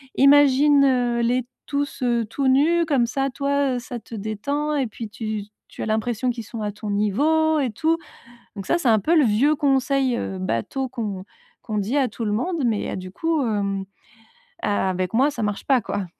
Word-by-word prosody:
imagine, 285 +1 +5
heu, 245 -3 +1
les 245 +1 +1 0.2
tous, 285 -1 -3
heu, 235 -2 +1
tout 270 +5 -2
nus 330 +6 +3
comme 275 -6 +2
ça 270 +3 -1
toi, 280 0 0
heu, - - -2
ça 245 0 -7
te 225 - -10
détend 280 +9 -2
et 275 -3 +1
puis 225 0 -7
tu 215 -1 -4 0.3
tu - - -10
as - - -2
l'impression 220 +3 -1
qu'ils 235 -2 -3
sont 220 +1 -7
à 205 -1 -3
ton 210 0 -7
niveau 295 +11 +2
et 265 -3 0
tout». 320 +9 +1 0.6
Donc 195 - -6
ça 340 - +2
c'est 290 -8 +1
un 220 -2 +5
peu 330 - +2
le 300 - +5
vieux 250 +8 +3
conseil, 270 -3 +1
heu, 190 - -4
bateau 185 - -2
qu'on 210 -7 -4 0.4
qu'on 215 -2 -4
dit 210 +6 -1
à 270 -3 +2
tout 230 - -5
le 210 - 0
monde, 320 - -1
mais 220 -3 0
a - - -4
du 185 0 -8
coup 325 +6 0
hem, 200 -2 -1 0.8
a 205 -2 0
avec 185 0 -2
moi 270 +6 +3
ça 240 -5 -5
marche 205 -1 -3
pas, 260 -4 +3
quoi. 200 -1 -3
245 Hz, 205 wpm, -23 LUFS, 215-280 Hz, 0.8 s, imagine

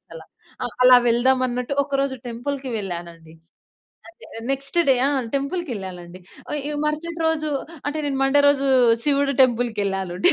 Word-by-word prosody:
అలా. - - -10 0.4
ఆ! - - 0 0.2
అలా 250 0 +9
వెళ్దాం 255 +3 +3
అన్నట్టు 250 +3 -3
ఒకరోజు 275 -1 -1
టెంపుల్‍కి 260 +3 -4
వెళ్ళానండి. 170 -4 -7 0.8
అదే 340 - -17 0.3
నెక్స్ట్ 275 +5 -3
డే. - - +6
ఆ! - - +1 0.3
టెంపుల్‌కెళ్ళాలండి. 200 - -5 0.3
అ - - -2
యొ 300 - -3
మరుసటి 330 +2 -3
రోజు 310 -1 -1 0.4
అంటే, 290 +2 -2
నేను 270 -1 -2
మండే 285 +1 +4
రోజు 275 -1 +2 0.4
శివుడి 280 -1 +1
టెంపుల్‌కెళ్ళాలుంటే 200 -7 0
265 Hz, 135 wpm, -22 LUFS, 205-285 Hz, 0.8 s, అలా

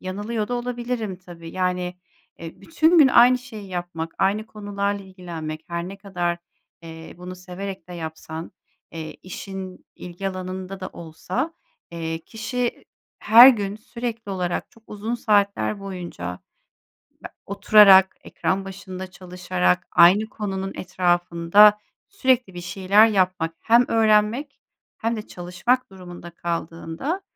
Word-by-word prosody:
yanılıyor 210 +4 -4
da 245 - -2
olabilirim 240 -4 -3
tabii, 175 -2 -12
yani, 180 0 -2 0.4
eee, 165 -1 -10
bütün 330 +1 +3
gün 290 -4 +8
aynı 250 0 +6
şeyi 220 -6 -10
yapmak, 175 -3 -5
aynı 205 +3 +1
konularla 205 -1 -3
ilgilenmek 165 -5 -7
her 170 +1 -4
ne 195 - -8
kadar, 175 -3 -3 0.4
eee, 160 0 -10
bunu 180 +1 -8
severek 185 0 -8
de - - -8
yapsan, 160 0 -7 0.4
eee, 160 -1 -7
işin 190 0 -8
ilgi 180 +2 -5
alanında 185 0 -6
da 185 - -5
olsa, 180 - -4 0.4
eee, 165 -1 -4
kişi, 235 +2 -4 0.3
her 235 +4 +9
gün 205 -5 +1
sürekli 230 -1 -6
olarak 180 -2 -3
çok 230 - -22
uzun 215 +3 -4
saatler 205 -2 +1
boyunca 175 - -6 0.9
be - - -11 0.2
oturarak, 200 -1 +6
ekran 195 +1 -2
başında 190 -1 -8
çalışarak, 180 - -1
aynı 190 +6 +6
konunun 195 -3 -4
etrafında 180 +3 +4 0.3
sürekli 255 - +1
bir 175 - -6
şeyler 195 +4 +4
yapmak 185 -5 0
hem 235 +2 +4
öğrenmek 225 +5 +2 0.4
hem 230 0 -1
de 215 - -7
çalışmak 180 +9 -1
durumunda 175 -2 -11
kaldığında, 170 - -4
190 Hz, 125 wpm, -23 LUFS, 175-215 Hz, 0.9 s, her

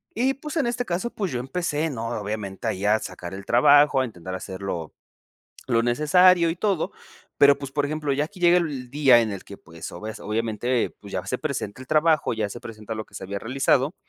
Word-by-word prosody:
y 260 +4 +2
pues, 300 +4 -6
en 280 - +2
este 245 +1 -1
caso, 180 +7 -2
pues, 195 -7 -3
yo 120 - -2
empecé, 160 +2 -2
¿no? 115 -3 -4
Obviamente 105 -2 -5
ahí 95 - -2
a 105 +1 +4
sacar 90 -3 -7
el 100 0 -9
trabajo, 140 +3 +5
a - - +1
intentar 95 -6 -8
hacerlo 95 -3 -5 0.7
lo 115 -3 +2
necesario, 170 +8 +4
y 165 - -3
todo, 195 -6 0 0.5
pero, 140 0 +6
pues, 140 -1 -7
por 145 0 0
ejemplo 150 -1 -2
ya 145 +2 +1
aquí 185 +4 -14
llega 175 0 +6
el 140 -7 -2
día 135 -3 +5
en 110 -2 -1
el 100 - -6
que, 100 - -9
pues, 85 0 -10
o 85 - -9
ves 110 0 -6
obviamente, 115 +3 -1
pues, - - -12
ya - - -3
se - - -2
presenta 100 +5 -4
el 130 - -11
trabajo, 155 -2 +3
ya 110 -2 -2
se - - -7
presenta 110 0 -7
lo 110 - -5
que - - -28
se - - -7
había 100 +1 -4
realizado, 135 - +1
130 Hz, 220 wpm, -24 LUFS, 105-160 Hz, 0.7 s, pero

